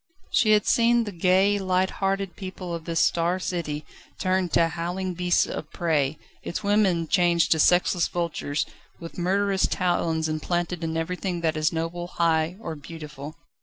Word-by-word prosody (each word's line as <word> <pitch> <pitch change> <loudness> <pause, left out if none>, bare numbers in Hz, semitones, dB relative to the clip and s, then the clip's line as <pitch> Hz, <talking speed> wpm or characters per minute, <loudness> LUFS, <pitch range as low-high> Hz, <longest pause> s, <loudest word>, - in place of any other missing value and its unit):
She 215 -2 +4
had 210 -1 +3
seen 235 0 +4
the 210 - -5
gay, 190 +3 +3
light 185 0 +1
hearted 195 -1 -1
people 185 -2 -6
of 165 -1 -5
this 165 -1 -1
Star 170 +2 +2
City 165 -5 -3 0.3
turned 185 -2 0
to 165 -1 +4
howling 180 +2 -3
beasts 175 0 +2
of - - -6
prey, 155 -4 0 0.2
its - - -5
women 200 -5 +2
changed 175 -2 +3
to 160 - +4
sexless 175 +1 +3
vultures, 165 -4 -2 0.3
with 165 +1 -9
murderous 195 +2 +1
talons 165 -3 0
implanted 175 +2 -2
in 160 0 -2
everything 180 +1 -3
that 160 -1 0
is 155 0 +1
noble, 165 +1 -3
high 165 0 +1
or 165 -8 -5
beautiful. 150 -1 -9
175 Hz, 160 wpm, -25 LUFS, 165-185 Hz, 0.3 s, She